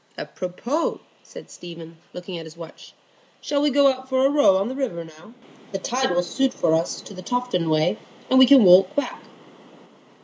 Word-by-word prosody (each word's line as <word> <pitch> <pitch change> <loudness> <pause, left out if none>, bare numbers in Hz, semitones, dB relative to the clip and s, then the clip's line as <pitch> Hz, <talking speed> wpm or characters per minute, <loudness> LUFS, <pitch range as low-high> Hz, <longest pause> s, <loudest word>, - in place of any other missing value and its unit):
"Apropos!" 235 - -4 0.2
said - - -14
Stephen, 165 -1 -11
looking 180 -1 -8
at 165 - -9
his 160 +1 -15
watch. 165 -1 -13 0.5
"Shall 285 -1 -2
we 295 - +2
go 280 0 +4
out 260 0 -9
for 260 0 +1
a 275 - +3
row 285 -10 +4
on 195 +2 -1
the 255 - -5
river 230 -12 -4
now? 160 +8 -17 0.4
The - - -1
tide 255 +7 -2
will 175 0 0
suit 265 +7 -1
for 160 - 0
us 165 +1 -1
to - - -12
the 185 - -10
Tofton 245 -6 -2
way, 160 +6 +1 0.3
and 260 - +4
we 260 - +7
can 275 -3 +7
walk 185 +3 +5
back." 285 - -3
195 Hz, 195 wpm, -22 LUFS, 170-260 Hz, 0.5 s, we